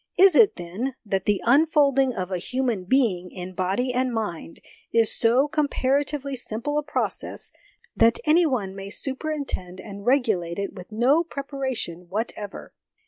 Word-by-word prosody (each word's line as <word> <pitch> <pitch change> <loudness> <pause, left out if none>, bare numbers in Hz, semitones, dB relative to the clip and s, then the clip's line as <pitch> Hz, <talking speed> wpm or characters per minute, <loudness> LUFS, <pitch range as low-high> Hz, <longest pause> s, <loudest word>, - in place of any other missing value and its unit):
Is 385 0 +7
it, 410 +6 +6
then, 195 +10 -4
that 195 -2 -1
the 205 -2 +1
unfolding 275 0 +4
of 185 0 -4
a 180 - -1
human 240 -2 -2
being 190 -6 +1
in 180 0 -8
body 195 +8 -1
and 255 0 0
mind 205 -8 -4 0.3
is 230 -1 +3
so 245 +5 +3
comparatively 285 -1 0
simple 245 +5 -2
a - - -4
process 295 - -3 0.4
that 230 +1 +4
any 325 +2 +5
one 205 -9 -2
may 195 0 -7
superintend 265 - -3
and 200 0 -9
regulate 215 -10 +1
it 200 0 -3
with 185 +1 -11
no 255 +9 +3
preparation 265 - -5
whatever? 210 0 -5
240 Hz, 145 wpm, -24 LUFS, 195-275 Hz, 0.4 s, Is